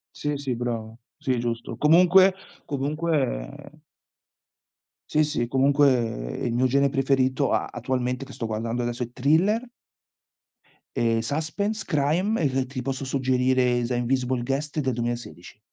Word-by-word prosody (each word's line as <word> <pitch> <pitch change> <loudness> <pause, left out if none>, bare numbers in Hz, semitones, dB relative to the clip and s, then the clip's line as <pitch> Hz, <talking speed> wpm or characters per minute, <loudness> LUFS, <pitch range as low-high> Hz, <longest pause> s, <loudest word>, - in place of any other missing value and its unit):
Sì, 150 -1 -2
sì 135 -3 -3
bravo. 115 -2 -4 0.2
Sì 130 -5 -1
giusto. 120 -1 -3
Comunque 180 +4 +5 0.3
comunque, 150 +3 -1 0.3
ehm 145 +1 -13 1.3
Sì, 155 0 +3
sì, 145 -5 -1
comunque 140 +2 +4 0.5
il 120 - -1
mio 125 +2 +2
gene 140 +2 +3
preferito, 135 0 +1
a - - +1
attualmente 125 +1 -2
che 135 - -12
sto 115 - -4
guardando 115 +2 -2
adesso 120 +1 -2
è 120 - -7
thriller. 165 - +2 1.3
Ehm, 115 -1 +1
suspense, 165 - -2
crime 175 +8 +1
e 135 -2 +1
ti 130 -1 -5
posso 135 +1 -3
suggerire, 130 -2 +1
The 125 0 -2
Invisible 125 0 0
Guest 145 +4 -2
del 130 -3 0
2016. 120 -6 -5
130 Hz, 135 wpm, -25 LUFS, 120-150 Hz, 1.3 s, Comunque